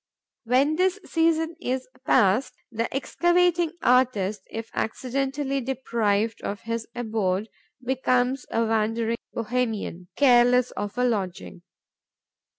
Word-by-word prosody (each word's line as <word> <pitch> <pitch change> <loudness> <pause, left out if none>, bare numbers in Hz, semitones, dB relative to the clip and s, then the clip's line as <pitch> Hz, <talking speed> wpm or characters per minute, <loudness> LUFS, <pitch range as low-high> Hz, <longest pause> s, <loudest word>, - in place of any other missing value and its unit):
When 270 +6 +2
this 375 +2 +2
season 325 0 +1
is 255 +1 -2 0.2
past, 220 +2 +3 0.2
the 230 0 -2
excavating 345 +4 +2
artist, 215 -6 +2
if 225 0 -6
accidentally 270 +3 -2
deprived 230 -4 -1
of 200 - -4
his 230 0 -4
abode, 215 -4 -1 0.4
becomes 255 0 +1
a 230 0 +1
wandering 225 +1 0
Bohemian, 220 -6 -2
careless 250 -2 +5
of 205 +3 -5
a 250 - +2
lodging. 190 -7 -2
245 Hz, 105 wpm, -25 LUFS, 220-270 Hz, 0.4 s, careless